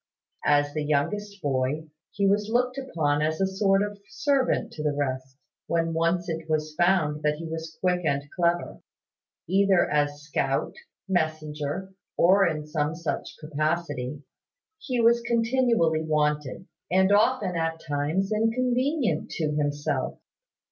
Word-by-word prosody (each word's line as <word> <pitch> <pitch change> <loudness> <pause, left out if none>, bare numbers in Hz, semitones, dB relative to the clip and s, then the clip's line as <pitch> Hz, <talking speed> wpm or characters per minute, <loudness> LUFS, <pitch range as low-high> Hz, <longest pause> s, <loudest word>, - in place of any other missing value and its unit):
As 145 0 +3
the 155 0 -2
youngest 200 +8 -1
boy, 140 +3 -1 0.2
he 200 0 -1
was 205 +2 +2
looked 250 +2 +1
upon 155 - 0
as 155 +1 0
a 195 - +3
sort 195 +1 +2
of 205 0 -5
servant 280 -7 +1
to 150 - -6
the 150 -1 0
rest, 130 -2 -3 0.3
when 165 0 0
once 170 +2 +1
it 160 -1 -4
was 155 0 -1
found 170 -3 +2
that 150 0 +1
he 165 +2 -7
was 160 0 -6
quick 180 -1 +1
and 140 -3 0
clever. 175 -1 0 0.7
Either 195 0 +3
as 145 0 0
scout, 140 -2 -1 0.3
messenger, 155 0 -2 0.2
or 190 +2 +5
in 155 -2 -2
some 155 0 -1
such 165 -1 -4
capacity, 150 -3 -2 0.6
he 255 - -2
was 235 +1 +5
continually 235 -8 +2
wanted; 150 0 0 0.2
and 190 +2 +3
often 210 -2 +3
at 165 0 -1
times 155 +7 -1
inconvenient 245 - +1
to 155 -2 -2
himself. 145 0 -1
165 Hz, 135 wpm, -26 LUFS, 150-195 Hz, 0.7 s, or